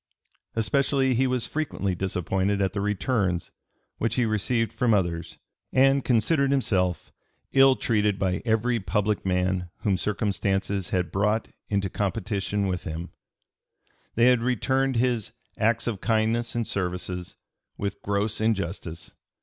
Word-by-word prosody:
Especially 135 +3 +2
he 130 +2 +2
was 125 -2 0
frequently 140 -11 -2
disappointed 95 +2 -1
at 95 -1 0
the 100 - -2
returns 100 -3 0 0.5
which 115 0 0
he 125 - +2
received 115 +2 0
from 115 -3 +3
others, 85 -3 -2 0.3
and 135 +1 +4
considered 140 +4 +2
himself 95 - 0 0.4
"ill 135 -1 +6
treated 105 -5 +1
by 95 -1 0
every 115 +1 +1
public 105 +1 0
man 90 -1 0
whom 100 -2 +2
circumstances 100 -1 -1
had 90 -1 -1
brought 105 +3 +1 0.2
into 100 -1 +1
competition 100 0 -1
with 90 -2 -2
him;" 80 +3 -5 1.0
they 115 - +4
had 125 -2 +5
returned 130 +2 +1
his 120 -2 0 0.3
"acts 110 +1 +2
of 110 -5 -3
kindness 115 +1 +1
and 120 -1 0
services" 90 -2 -3 0.4
with 100 0 -4
"gross 100 +2 -1
injustice." 95 -6 -2
105 Hz, 130 wpm, -26 LUFS, 95-120 Hz, 1.0 s, ill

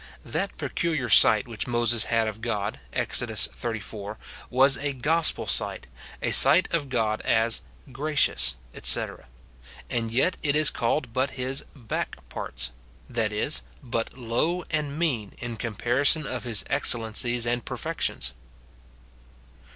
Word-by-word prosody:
That - - -3
peculiar 155 -7 -2
sight 110 +4 +6
which 115 -1 -5
Moses 120 -2 +1
had 115 -1 +1
of 110 0 -6
God, 105 -3 -3
Exod. - - 0
xxxiv., 105 -2 -3 0.3
was 135 +2 +5
a 140 0 -2
gospel 155 +5 +3
sight, - - -1 0.4
a - - +1
sight 180 +3 +7
of 150 -5 0
God 110 -4 -1
as 115 -3 +2 0.3
"gracious," 130 - +1 0.2
etc., - - +1 0.6
and 115 -2 -1
yet 135 +10 +1
it 145 -1 +1
is 155 0 +5
called 120 +1 -1
but 130 +3 0
his 130 +3 0
"back 120 -6 -4
parts;" 65 0 -4 0.4
that 115 -3 -1
is, 105 +8 +1 0.2
but 115 0 -4
low 145 +9 -1
and 150 -2 -2
mean, 130 -12 -1
in 120 -1 -6
comparison 120 +7 0
of 130 -1 -5
his 110 -5 +2
excellencies 120 -2 +1
and 120 0 -1
perfections. 60 +1 -3
120 Hz, 130 wpm, -25 LUFS, 110-140 Hz, 0.6 s, sight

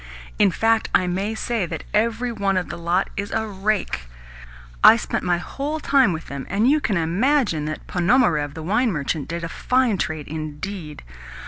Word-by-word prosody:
In 205 -2 +6
fact, 225 +4 +1
I 190 -2 +3
may 195 +5 -2
say 220 -4 -1
that - - -5
every 230 +3 +1
one 200 -4 0
of 180 - -2
the - - -5
lot 170 +3 0
is 200 +1 -3
a 220 0 -1
rake. 195 - -2 0.8
I - - +10
spent - - -3
my 175 -1 +2
whole 285 - -4
time 270 -8 +3
with 160 -1 -5
them, 140 -1 -7
and 205 +5 +2
you 300 +3 +4
can 205 -8 0
imagine 180 - +1
that 155 0 -5
Ponomarev, 170 - +2
the 160 - -6
wine 220 +7 +1
merchant, 150 -2 -2
did 170 0 -4
a - - -2
fine 250 +3 +1
trade 155 -2 -3
indeed! 155 +2 -6
195 Hz, 185 wpm, -22 LUFS, 165-225 Hz, 0.8 s, I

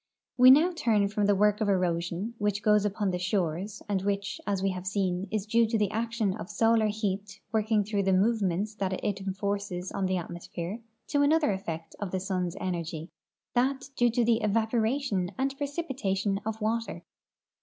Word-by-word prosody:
\\'e 250 +1 +8 0.2
turn 230 -10 +2
now - - +2
from 205 0 0
the 205 - +4
work 210 +2 +3
of 210 - +2
erosion 180 +2 0
which 205 -1 0
goes 210 -1 +4
on - - -2
upon 205 -1 -1
the 180 - -2
shores, 180 +1 -2
and 200 -2 0
which, 200 0 -2
as 195 -2 0
we 195 - +2
have 185 0 -6
seen, 190 -1 -1
is 210 -1 -2
due 230 +1 +3
to 225 +1 0
the 210 -2 +1
action 225 -3 -1
of 195 - -7
solar 225 +1 +3
heat 205 -1 -3
working 215 -1 +2
through 205 0 -1
the 195 0 +1
movements 200 0 +1
that 195 -3 -2
it 200 +1 -2
enforces 195 -1 -3
on 190 - -1
the 185 0 0
atmosphere, 175 +3 -5 0.3
to 285 - +1
another 300 -3 +3
effect 165 -4 -5
of 205 - -3
the 185 - -2
sun's 185 -2 -2
energ\% 170 -3 -4 0.4
that 265 +2 0
due 240 0 +3
to 235 +1 +1
the 230 -1 +3
evaporation 220 -1 +1
and 270 +1 -1
precipitation 265 - -2
of 220 0 -3
water. 225 +2 -2
205 Hz, 185 wpm, -28 LUFS, 190-225 Hz, 0.4 s, e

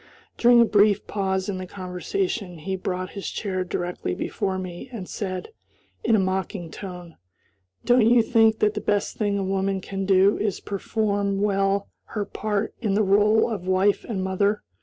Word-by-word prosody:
During 240 0 +6
a 235 - +7
brief 210 -1 +3
pause 190 -2 -1
in 195 -2 -3
the 185 - -6
conversation 185 - -3
he 190 +5 -3
brought 185 0 -3
his 200 - -5
chair 185 -3 -2
directly 175 - -3
before 190 -1 -2
me 185 +5 -7
and 205 -7 -6
said, 185 - -4 0.5
in 230 - +3
a - - +3
mocking 185 -2 -2
tone, 180 -4 -9 0.7
"Don't 245 -2 +5
you 240 -1 +5
think 225 -2 +4
that 210 0 +3
the 210 - -3
best 205 0 0
thing 205 -2 0
a 195 - -1
woman 195 0 0
can 195 0 -4
do 195 +1 +4
is 210 -3 0
to - - -16
perform 200 -1 -1
well 195 -1 +1 0.3
her 205 - 0
part 210 0 -2
in 205 -4 0
the 215 - +3
role 210 +3 +4
of 200 -6 -4
wife 190 +2 +2
and 195 -5 -3
mother? 200 +2 0
200 Hz, 180 wpm, -24 LUFS, 185-210 Hz, 0.7 s, a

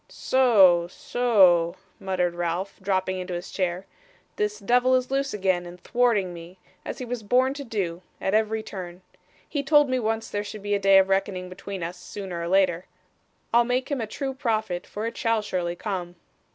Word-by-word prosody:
'So, 195 -10 +4
so,' 185 -6 +3 0.2
muttered 185 -3 -1
Ralph, 175 +3 -3
dropping 185 -1 0
into 180 -1 -4
his 175 +1 -6
chair; 185 0 -2 0.5
'this 210 0 -1
devil 245 +5 +3
is 255 0 0
loose 275 0 0
again, 185 -3 0
and 175 +1 -11
thwarting 215 -4 +1
me, 170 +2 -11 0.3
as - - -6
he 255 - -5
was 245 -1 -4
born 255 +5 +2
to 285 0 -7
do, 190 -8 -3 0.2
at 190 - -1
every 220 0 +1
turn. 180 -3 -8 0.4
He 290 - -2
told 295 -1 +4
me 255 - +1
once 225 0 -1
there 205 0 -3
should 210 0 -8
be 205 0 -1
a 200 - +2
day 195 0 +6
of 190 0 +4
reckoning 190 -1 0
between 185 0 -7
us, 175 +2 -5
sooner 180 -1 -6
or 170 - -3
later. 185 -1 +2 0.7
I'll 235 +1 +6
make 250 +3 -1
him 275 -4 -1
a 220 - -3
true 270 +5 -4
prophet, 220 -9 -2
for 210 +2 -5
it 230 - -4
shall 225 -2 +1
surely 175 -4 -2
come. 180 -3 -4
200 Hz, 190 wpm, -25 LUFS, 180-235 Hz, 0.7 s, day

